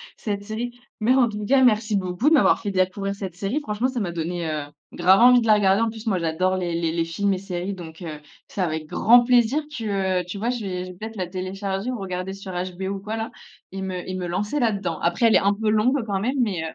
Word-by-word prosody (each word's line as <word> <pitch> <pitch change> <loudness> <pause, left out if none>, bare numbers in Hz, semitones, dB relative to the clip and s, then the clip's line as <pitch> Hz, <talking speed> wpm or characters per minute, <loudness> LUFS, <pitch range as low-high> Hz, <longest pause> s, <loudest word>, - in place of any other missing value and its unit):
cette 205 -2 -4
série. 230 +3 -4 0.3
Mais 245 +4 +4
en 250 -3 +5
tout 210 -1 -5
cas 270 +3 +4
merci 215 -3 +3
beaucoup 185 +9 +1
de - - +3
m'avoir 285 - +4
fait 205 -3 -3
découvrir 195 +1 0
cette 190 -3 -6
série. 200 +10 -2
Franchement 230 0 -1
ça 255 -2 -3
m'a 185 -5 -2
donné, 170 +1 -3
heu, 150 -1 -2 0.3
grave 185 +2 +5
envie 245 +1 +7
de 225 - -2
la 215 - +7
regarder. 200 +1 +3
En 230 - +2
plus, 220 +1 -9
moi 195 -4 +1
j'adore 170 +3 0
les 175 -2 -2
les 165 -1 -1
les 165 -1 0
films 200 +4 0
et - - -1
séries 185 0 -4
donc, 165 -2 -10
heu, 155 -2 -7 0.3
c'est 195 - -4
avec 160 -3 -1
grand 240 +8 +5
plaisir 250 +4 +3
que, 195 -4 0
heu, - - -7
tu 180 +3 -6
vois 230 +4 -1
je 245 -3 -2
vais 180 -1 -3
je 185 - -8
vais 180 - -14
peut-être 220 +2 -7
la 180 -2 -2
télécharger, 195 +4 -3
ou 245 - -4
regarder 185 0 -4
sur 195 -1 -8
HBO 185 +1 -4
ou - - -5
quoi 215 +2 -4
là, 225 +2 -3 0.4
et 195 - -5
me 185 -2 -4
et 185 - -3
me 180 - -3
lancer 210 +11 -1
là-dedans. 195 -8 0
Après, 175 +7 +1
elle 220 - +4
est - - +7
un 200 +1 +2
peu 215 +1 -1
longue 220 +6 +3
quand 200 -2 -1
même 255 +5 -1
mais, 195 -8 0
heu. 160 - -4
195 Hz, 265 wpm, -23 LUFS, 180-220 Hz, 0.4 s, envie